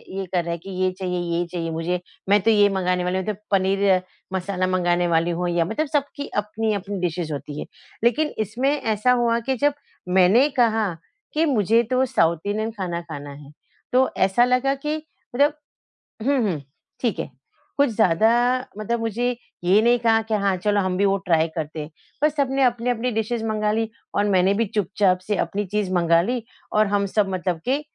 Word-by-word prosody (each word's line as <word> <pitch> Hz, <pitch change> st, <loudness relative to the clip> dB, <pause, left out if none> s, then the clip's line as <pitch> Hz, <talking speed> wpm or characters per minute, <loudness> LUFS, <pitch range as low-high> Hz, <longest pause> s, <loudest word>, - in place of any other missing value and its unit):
ये 195 Hz, -, -3 dB
कर 175 Hz, -1 st, +2 dB
रहा 170 Hz, -, -4 dB
है 170 Hz, -, -2 dB
कि 180 Hz, +4 st, -12 dB
ये 185 Hz, -, +3 dB
चाहिए 180 Hz, -1 st, -2 dB, 0.2 s
ये 175 Hz, -, 0 dB
चाहिए 165 Hz, -2 st, -3 dB
मुझे, 170 Hz, +2 st, -2 dB, 0.3 s
मैं 205 Hz, +1 st, +6 dB
तो 225 Hz, +4 st, +3 dB
ये 205 Hz, -1 st, +5 dB
मँगाने 180 Hz, -2 st, 0 dB
वाली 180 Hz, +1 st, -1 dB
हूँ 190 Hz, -, -2 dB
तो 215 Hz, -, -1 dB, 0.2 s
पनीर 195 Hz, -1 st, +3 dB, 0.3 s
मसाला 185 Hz, 0 st, -1 dB
मँगाने 175 Hz, -1 st, +1 dB
वाली 170 Hz, +1 st, +2 dB
हूँ 180 Hz, 0 st, 0 dB
या 170 Hz, -1 st, +1 dB
मतलब 300 Hz, -, -2 dB
सबकी 285 Hz, -1 st, -2 dB
अपनी-अपनी 210 Hz, -2 st, -3 dB
डिशेस 170 Hz, -2 st, -2 dB
होती 145 Hz, +1 st, -6 dB
है। -, -, -4 dB, 0.4 s
लेकिन 300 Hz, +6 st, +2 dB, 0.2 s
इसमें 245 Hz, +7 st, -1 dB
ऐसा 220 Hz, +2 st, +1 dB
हुआ 235 Hz, 0 st, +2 dB
कि 265 Hz, -, +2 dB
जब 290 Hz, -, +4 dB, 0.4 s
मैंने 205 Hz, +10 st, +6 dB
कहा 225 Hz, -3 st, +3 dB, 0.5 s
कि 320 Hz, +2 st, +2 dB
मुझे 230 Hz, -, +3 dB
तो 255 Hz, -, +3 dB
साउथ 170 Hz, -10 st, +2 dB
इंडियन 215 Hz, +2 st, -1 dB
खाना 180 Hz, -5 st, -4 dB
खाना 145 Hz, -4 st, -8 dB
है 140 Hz, 0 st, -12 dB, 0.4 s
तो 260 Hz, +1 st, +4 dB
ऐसा 195 Hz, +6 st, +4 dB
लगा 255 Hz, +2 st, +2 dB
कि 300 Hz, +3 st, -3 dB, 0.4 s
मतलब 290 Hz, +3 st, +4 dB, 0.7 s
हुँ, 280 Hz, -2 st, +3 dB
हुँ 170 Hz, -9 st, -1 dB, 0.4 s
ठीक 235 Hz, -4 st, 0 dB
है, -, -, -3 dB, 0.5 s
कुछ 285 Hz, -2 st, +4 dB
ज़्यादा 220 Hz, 0 st, +3 dB, 0.5 s
मतलब 230 Hz, +2 st, -2 dB
मुझे 235 Hz, +2 st, -1 dB, 0.3 s
ये 190 Hz, +5 st, +5 dB
नहीं 240 Hz, +1 st, +4 dB
कहा 225 Hz, -1 st, +3 dB
कि 220 Hz, 0 st, -5 dB
हाँ, 200 Hz, -2 st, +2 dB
चलो 205 Hz, +3 st, +1 dB
हम 185 Hz, -1 st, -1 dB
भी 200 Hz, -, +2 dB
वो 195 Hz, 0 st, +3 dB
ट्राई 165 Hz, -4 st, +1 dB
करते 155 Hz, 0 st, -4 dB
हैं 150 Hz, -, -7 dB, 0.3 s
पर 300 Hz, -, +5 dB
सबने 275 Hz, -2 st, 0 dB
अपनी-अपनी 245 Hz, 0 st, +1 dB
डिशेस 225 Hz, +1 st, -2 dB
मँगा 215 Hz, -1 st, 0 dB
ली 225 Hz, 0 st, 0 dB, 0.3 s
और 205 Hz, -, +2 dB
मैंने 190 Hz, 0 st, +3 dB
भी 225 Hz, +3 st, +1 dB
चुपचाप 195 Hz, -2 st, +1 dB
से 210 Hz, -, +1 dB
अपनी 205 Hz, +3 st, -1 dB
चीज़ 205 Hz, 0 st, -2 dB
मँगा 170 Hz, -1 st, +4 dB
ली 240 Hz, +4 st, -2 dB, 0.3 s
और 215 Hz, -1 st, +4 dB
हम 200 Hz, 0 st, +1 dB
सब 200 Hz, 0 st, +1 dB
मतलब 180 Hz, -2 st, -2 dB
के 270 Hz, +4 st, +1 dB
205 Hz, 195 wpm, -23 LUFS, 180-235 Hz, 0.7 s, मैं